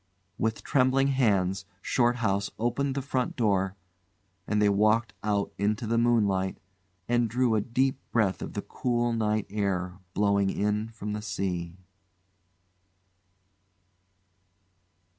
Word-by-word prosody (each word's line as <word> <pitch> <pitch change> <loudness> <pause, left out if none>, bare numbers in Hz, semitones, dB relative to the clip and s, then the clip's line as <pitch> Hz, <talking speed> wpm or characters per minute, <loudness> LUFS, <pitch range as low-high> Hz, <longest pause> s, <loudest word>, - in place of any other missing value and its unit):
With 110 0 -1
trembling 135 +1 +3
hands 100 -8 +1
Shorthouse 110 -4 +1
opened 130 +4 0
the 140 - -2
front 130 -2 -1
door, 95 -5 +1 0.7
and 105 - +1
they 105 - +4
walked 110 +2 +3
out 105 -1 -1
into 105 +3 0
the 115 +1 +1
moonlight 100 -6 +2 0.5
and 120 -1 +2
drew 125 +1 +2
a 110 - +2
deep 130 +4 0
breath 105 -5 +1
of - - -6
the - - -4
cool 120 -1 -1
night 110 -2 0
air 95 -3 -2 0.2
blowing 100 -1 +2
in 105 +2 -1
from 105 -2 -5
the 105 - -3
sea. 90 -4 -3
110 Hz, 120 wpm, -28 LUFS, 100-120 Hz, 0.7 s, they